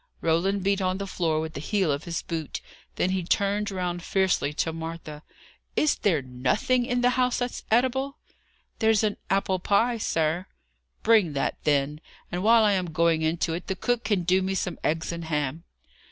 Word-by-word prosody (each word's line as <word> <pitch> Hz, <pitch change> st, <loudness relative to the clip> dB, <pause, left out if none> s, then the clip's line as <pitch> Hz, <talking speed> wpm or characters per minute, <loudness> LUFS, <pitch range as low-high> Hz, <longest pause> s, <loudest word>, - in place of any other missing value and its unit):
Roland 180 Hz, +4 st, +1 dB
beat 200 Hz, 0 st, +1 dB
on 185 Hz, 0 st, 0 dB
the 200 Hz, -, -4 dB
floor 165 Hz, -4 st, 0 dB
with 160 Hz, 0 st, -4 dB
the -, -, -5 dB
heel 185 Hz, +1 st, +1 dB
of 140 Hz, +2 st, -3 dB
his 170 Hz, -1 st, -3 dB
boot. 160 Hz, -3 st, -4 dB, 0.4 s
Then 185 Hz, -, +1 dB
he 190 Hz, 0 st, 0 dB
turned 200 Hz, +4 st, 0 dB
round 180 Hz, -2 st, -3 dB
fiercely 185 Hz, -6 st, +1 dB
to 160 Hz, +2 st, -1 dB
Martha. 160 Hz, -2 st, -7 dB, 0.5 s
"Is 305 Hz, -, +3 dB
there 165 Hz, -9 st, +1 dB
nothing 130 Hz, -, 0 dB
in 245 Hz, -1 st, 0 dB
the 245 Hz, 0 st, +4 dB
house 250 Hz, -1 st, +2 dB
that's 245 Hz, 0 st, -3 dB
eatable?" 265 Hz, +4 st, +1 dB, 0.6 s
"There's 220 Hz, -1 st, +3 dB
an 210 Hz, -1 st, 0 dB
apple 195 Hz, -1 st, +1 dB
pie, 230 Hz, +6 st, +2 dB
sir." 165 Hz, -1 st, 0 dB, 0.6 s
"Bring 215 Hz, -8 st, +4 dB
that, 135 Hz, -, -1 dB
then. 145 Hz, +1 st, +1 dB, 0.3 s
And 175 Hz, -, -2 dB
while 225 Hz, +2 st, +6 dB
I 210 Hz, -, +4 dB
am 185 Hz, -2 st, 0 dB
going 165 Hz, 0 st, +2 dB
into 160 Hz, +1 st, 0 dB
it, 175 Hz, +2 st, -5 dB
the 190 Hz, -, -1 dB
cook 245 Hz, +4 st, -1 dB
can 205 Hz, -4 st, +1 dB
do 185 Hz, +2 st, +3 dB
me 190 Hz, +1 st, -1 dB
some 180 Hz, -2 st, -2 dB
eggs 165 Hz, +2 st, 0 dB
and 170 Hz, -1 st, -5 dB
ham." 150 Hz, +1 st, -2 dB
180 Hz, 185 wpm, -26 LUFS, 160-205 Hz, 0.6 s, while